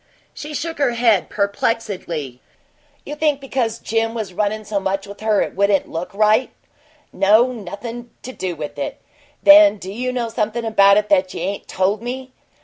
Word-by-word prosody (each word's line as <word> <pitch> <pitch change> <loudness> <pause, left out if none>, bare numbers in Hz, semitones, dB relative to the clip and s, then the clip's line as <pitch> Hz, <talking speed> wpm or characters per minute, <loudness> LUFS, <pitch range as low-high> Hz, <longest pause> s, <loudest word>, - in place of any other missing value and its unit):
She 300 0 -7
shook 325 0 -4
her 270 -4 +2
head 230 -5 +2
perplexedly. 200 - -2 0.7
"You 295 - -6
think 300 -2 +1
because 255 -4 -2
because - - -21
Jim 225 0 0
was 210 -5 -4
runnin' 210 +2 -1
so 205 -1 -1
much 195 0 -2
with 200 0 -11
her 215 -2 +2
it - - -7
wouldn't 200 0 +2
look 165 +2 -4
right?" 215 +4 +3 0.6
"No. 220 +6 +4
Nothin' 235 +3 -7
to 255 - -6
do 185 -8 -4
with 145 -2 -7
it." 140 - -4 0.4
"Then 300 -5 +8
do 190 -1 -8
you 250 +5 -3
know 245 -2 -2
something 225 +1 -2
about 200 -2 +5
it 210 0 0
that 185 -2 +3
you - - -5
ain't 195 +2 -4
told 195 +3 0
me?" 255 +2 -6
215 Hz, 180 wpm, -20 LUFS, 195-240 Hz, 0.7 s, Then